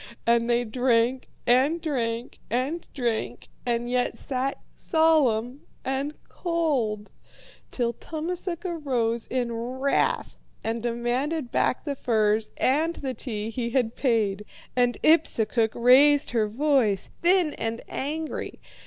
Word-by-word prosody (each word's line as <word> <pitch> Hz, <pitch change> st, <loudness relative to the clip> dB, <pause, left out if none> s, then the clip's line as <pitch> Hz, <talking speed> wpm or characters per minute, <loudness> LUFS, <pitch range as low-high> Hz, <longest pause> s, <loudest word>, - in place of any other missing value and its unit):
And 235 Hz, 0 st, +3 dB
they 240 Hz, 0 st, +3 dB
drank 245 Hz, +1 st, +1 dB, 0.2 s
and 265 Hz, +7 st, +3 dB
drank 240 Hz, -7 st, -3 dB
and 270 Hz, +8 st, -1 dB
drank, 235 Hz, -5 st, -3 dB, 0.2 s
and 240 Hz, 0 st, 0 dB
yet 245 Hz, 0 st, 0 dB
sat 270 Hz, 0 st, -2 dB, 0.2 s
solemn 280 Hz, -6 st, +2 dB, 0.2 s
and 275 Hz, +3 st, -2 dB
cold, 275 Hz, -, -1 dB, 0.6 s
till 235 Hz, -2 st, -1 dB
Tummasook 340 Hz, -, -5 dB
arose 250 Hz, -9 st, -1 dB
in 245 Hz, -2 st, -1 dB
wrath 255 Hz, +4 st, 0 dB, 0.3 s
and 225 Hz, +1 st, -2 dB
demanded 240 Hz, +5 st, -1 dB
back -, -, +1 dB
the 290 Hz, -, -1 dB
furs 215 Hz, -3 st, +1 dB
and 315 Hz, +6 st, +2 dB
the 265 Hz, -2 st, -4 dB
tea 220 Hz, -3 st, -4 dB
he 235 Hz, 0 st, -2 dB
had 235 Hz, -2 st, 0 dB
paid. 215 Hz, -6 st, +1 dB, 0.3 s
And 245 Hz, -1 st, +2 dB
Ipsukuk 230 Hz, -8 st, +3 dB
raised 275 Hz, +4 st, +5 dB
her 225 Hz, -3 st, +2 dB
voice, 235 Hz, -4 st, +1 dB
thin 350 Hz, -3 st, +3 dB
and 225 Hz, +1 st, -4 dB
angry. 310 Hz, +3 st, -4 dB
250 Hz, 120 wpm, -26 LUFS, 230-290 Hz, 0.6 s, raised